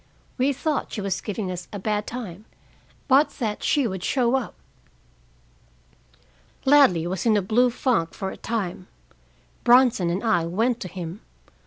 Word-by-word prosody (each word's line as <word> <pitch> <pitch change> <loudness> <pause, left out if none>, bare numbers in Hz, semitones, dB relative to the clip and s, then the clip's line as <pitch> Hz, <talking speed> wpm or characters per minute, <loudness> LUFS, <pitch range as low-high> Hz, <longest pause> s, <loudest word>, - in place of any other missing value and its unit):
We 265 +3 +3
thought 295 +2 -2
she - - -4
was 195 -2 -2
giving 205 -3 -4
us 180 -1 -6
a 205 - -5
bad 210 +1 -2
time, 215 -5 -7 0.6
but 280 +2 +5
that 215 -5 -3
she 285 -3 +2
would 190 -3 -5
show 245 -2 +1
up. 260 -4 -3 2.1
"Ladley 265 - +5
was 185 +5 -2
in 215 -2 +4
a - - +2
blue 240 +6 +3
funk 235 -9 0
for 190 - -4
a - - -9
time. 195 -5 -4 0.8
Bronson 240 -7 +5
and 180 +5 -2
I 195 -8 +2
went 225 +7 0
to 185 - -5
him. 180 +2 -7
215 Hz, 155 wpm, -24 LUFS, 185-250 Hz, 2.1 s, but